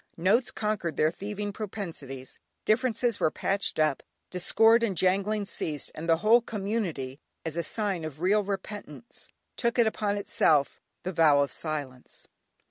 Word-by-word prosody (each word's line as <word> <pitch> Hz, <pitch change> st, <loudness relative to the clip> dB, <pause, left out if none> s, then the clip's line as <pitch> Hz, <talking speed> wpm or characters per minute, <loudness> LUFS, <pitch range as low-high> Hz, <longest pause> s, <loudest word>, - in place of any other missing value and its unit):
Notes 205 Hz, +9 st, +3 dB
conquered 210 Hz, -6 st, -2 dB
their 155 Hz, +1 st, +3 dB
thieving 205 Hz, +2 st, -5 dB
propensities, 165 Hz, -, -6 dB, 0.3 s
differences 235 Hz, 0 st, +1 dB
were -, -, +3 dB
patched 195 Hz, +5 st, 0 dB
up, 155 Hz, -3 st, +2 dB, 0.3 s
discord 225 Hz, +5 st, +5 dB
and 205 Hz, -6 st, 0 dB
jangling 200 Hz, +4 st, +1 dB
ceased, 155 Hz, -6 st, -3 dB
and 165 Hz, +2 st, -6 dB
the 165 Hz, -, +5 dB
whole 235 Hz, +3 st, +7 dB
community, 195 Hz, -, -3 dB, 0.3 s
as 160 Hz, -1 st, -3 dB
a 170 Hz, -, 0 dB
sign 195 Hz, 0 st, -2 dB
of 155 Hz, -2 st, -6 dB
real 195 Hz, +5 st, +3 dB
repentance, 200 Hz, 0 st, -6 dB, 0.3 s
took 235 Hz, -1 st, 0 dB
upon 215 Hz, -3 st, +2 dB
itself 155 Hz, -7 st, +2 dB, 0.2 s
the 185 Hz, +1 st, -3 dB
vow 155 Hz, -4 st, +5 dB
of 140 Hz, -, 0 dB
silence. 145 Hz, -5 st, -6 dB
195 Hz, 140 wpm, -28 LUFS, 155-215 Hz, 0.3 s, whole